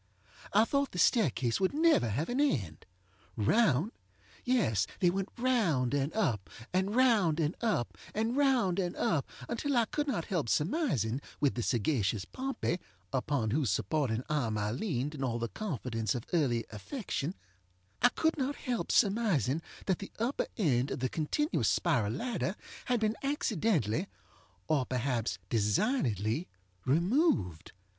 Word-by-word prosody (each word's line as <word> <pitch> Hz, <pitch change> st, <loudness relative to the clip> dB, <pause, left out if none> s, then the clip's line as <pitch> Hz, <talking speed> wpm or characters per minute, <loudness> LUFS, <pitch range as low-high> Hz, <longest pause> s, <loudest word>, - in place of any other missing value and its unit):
I 215 Hz, +3 st, +5 dB
thought 280 Hz, +2 st, 0 dB
the -, -, -5 dB
staircase 135 Hz, -, +2 dB
would 190 Hz, +7 st, +1 dB
never 315 Hz, -, +4 dB
have 130 Hz, +10 st, -1 dB
an 245 Hz, +3 st, -1 dB
end. 95 Hz, -, -1 dB, 0.5 s
Round! 160 Hz, -, +3 dB, 0.5 s
Yes, 145 Hz, -, +2 dB
they 180 Hz, -3 st, +4 dB
went 195 Hz, +1 st, -2 dB
round 200 Hz, -, +2 dB
and 140 Hz, +1 st, +1 dB
up, 120 Hz, -, 0 dB, 0.2 s
and 190 Hz, +3 st, +1 dB
round 215 Hz, -11 st, +4 dB
and 160 Hz, +2 st, 0 dB
up 210 Hz, -, 0 dB, 0.2 s
and 225 Hz, +3 st, 0 dB
round 255 Hz, -10 st, +3 dB
and 180 Hz, -2 st, -1 dB
up, 145 Hz, -5 st, 0 dB, 0.2 s
until 275 Hz, +3 st, -1 dB
I 235 Hz, -, +4 dB
could 295 Hz, +5 st, -2 dB
not 210 Hz, -12 st, -1 dB
help 165 Hz, -, -1 dB
surmising, 150 Hz, -, 0 dB, 0.2 s
with 145 Hz, -2 st, +2 dB
the 120 Hz, -, -2 dB
sagacious 110 Hz, -5 st, 0 dB
Pompey, 260 Hz, -9 st, -2 dB, 0.3 s
upon 130 Hz, -4 st, 0 dB
whose 140 Hz, -2 st, +1 dB
supporting 115 Hz, +4 st, 0 dB
arm 125 Hz, -8 st, 0 dB
I 105 Hz, 0 st, -1 dB
leaned 145 Hz, -, -2 dB
in 140 Hz, -3 st, -5 dB
all 120 Hz, -3 st, 0 dB
the 115 Hz, -1 st, -3 dB
confidence 125 Hz, -, -2 dB
of 120 Hz, -, -3 dB
early 125 Hz, -9 st, +2 dB
affectionŌĆöI 180 Hz, -, -4 dB, 0.8 s
could 320 Hz, -1 st, +1 dB
not 275 Hz, +2 st, -1 dB
help 245 Hz, -2 st, -2 dB
surmising 195 Hz, -, +2 dB, 0.2 s
that 190 Hz, -3 st, +1 dB
the 200 Hz, -, -8 dB
upper 235 Hz, +5 st, -1 dB
end 135 Hz, -, +2 dB
of -, -, -3 dB
the 130 Hz, -, +1 dB
continuous 295 Hz, -, 0 dB
spiral 130 Hz, -, +1 dB
ladder 220 Hz, -, -2 dB, 0.3 s
had 245 Hz, -1 st, +1 dB
been 215 Hz, 0 st, +1 dB
accidentally, 200 Hz, -, 0 dB, 0.6 s
or 155 Hz, -4 st, +2 dB
perhaps 125 Hz, -5 st, -1 dB
designedly, 115 Hz, -, +1 dB, 0.4 s
removed. 160 Hz, -, +1 dB
160 Hz, 145 wpm, -31 LUFS, -, 0.8 s, I